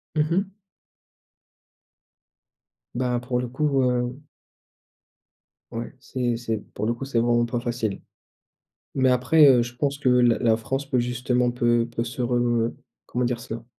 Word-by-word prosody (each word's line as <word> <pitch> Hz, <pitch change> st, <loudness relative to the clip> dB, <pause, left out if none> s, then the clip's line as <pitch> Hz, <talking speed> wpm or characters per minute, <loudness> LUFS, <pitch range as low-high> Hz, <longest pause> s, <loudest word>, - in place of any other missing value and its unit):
Mmh 155 Hz, +1 st, +1 dB
mh. 195 Hz, +2 st, 0 dB, 2.4 s
Bah, 125 Hz, -1 st, 0 dB
pour 125 Hz, 0 st, -2 dB
le 125 Hz, -, -2 dB
coup, 135 Hz, +2 st, 0 dB
heu 125 Hz, +2 st, -1 dB, 1.5 s
Ouais, 115 Hz, +1 st, -5 dB
c'est 125 Hz, -2 st, -2 dB
c'est 115 Hz, -2 st, -2 dB, 0.2 s
pour 105 Hz, -, -3 dB
le 120 Hz, -, +1 dB
coup, 120 Hz, -, -7 dB
c'est 130 Hz, -4 st, 0 dB
vraiment 120 Hz, 0 st, +2 dB
pas 120 Hz, 0 st, -2 dB
facile. 120 Hz, -4 st, -3 dB, 0.9 s
Mais, 130 Hz, -1 st, +3 dB
après, 145 Hz, +5 st, +5 dB
heu, 125 Hz, -3 st, +6 dB
je 120 Hz, +1 st, -6 dB
pense 140 Hz, +1 st, -1 dB
que 135 Hz, -, +1 dB
la 125 Hz, -2 st, +4 dB
la 115 Hz, -2 st, +3 dB
France 135 Hz, +4 st, -4 dB
peut 125 Hz, -, +1 dB
justement 125 Hz, 0 st, 0 dB
peut 120 Hz, -1 st, +2 dB
peut 115 Hz, -, 0 dB
se 125 Hz, +1 st, -4 dB
re 120 Hz, -1 st, +1 dB, 0.3 s
comment 125 Hz, 0 st, -1 dB
dire 120 Hz, -1 st, -1 dB
ça? 115 Hz, -1 st, -7 dB
125 Hz, 150 wpm, -24 LUFS, 120-130 Hz, 2.4 s, heu